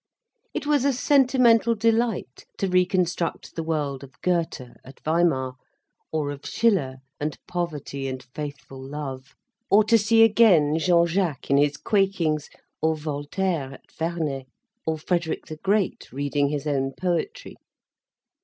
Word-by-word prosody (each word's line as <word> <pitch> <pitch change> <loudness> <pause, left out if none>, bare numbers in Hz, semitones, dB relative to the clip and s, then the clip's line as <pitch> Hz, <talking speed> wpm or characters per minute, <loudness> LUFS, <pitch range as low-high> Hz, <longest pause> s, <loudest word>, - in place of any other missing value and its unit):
It - - -3
was 290 -3 +2
a 280 0 +3
sentimental 250 -3 +4
delight 225 - 0
to 195 - 0
reconstruct 180 -2 0
the 165 - -2
world 150 -4 -2
of 135 -1 -14
Goethe 165 -8 -1
at 130 +1 -14
Weimar, 155 -6 +1 0.5
or 150 -2 -1
of 145 0 -8
Schiller 190 - +1 0.2
and 150 +1 -3
poverty 150 -6 -3
and 130 -1 -5
faithful 145 -3 -7
love, 135 -1 -7 0.3
or 210 +2 +6
to 225 +2 +4
see 225 +2 +5
again 185 -9 +5
Jean 170 0 +4
Jacques 170 -6 -1
in 140 - +5
his 145 0 +2
quakings, 185 -8 0 0.3
or 160 0 +2
Voltaire 150 0 -2
at - - -20
Ferney, 160 -5 -3 0.4
or 160 0 0
Frederick 170 +1 -2
the 155 - -8
Great 195 +3 0
reading 140 +1 0
his 145 0 -3
own 135 -2 0
poetry. 290 - -3
160 Hz, 135 wpm, -25 LUFS, 145-195 Hz, 0.5 s, or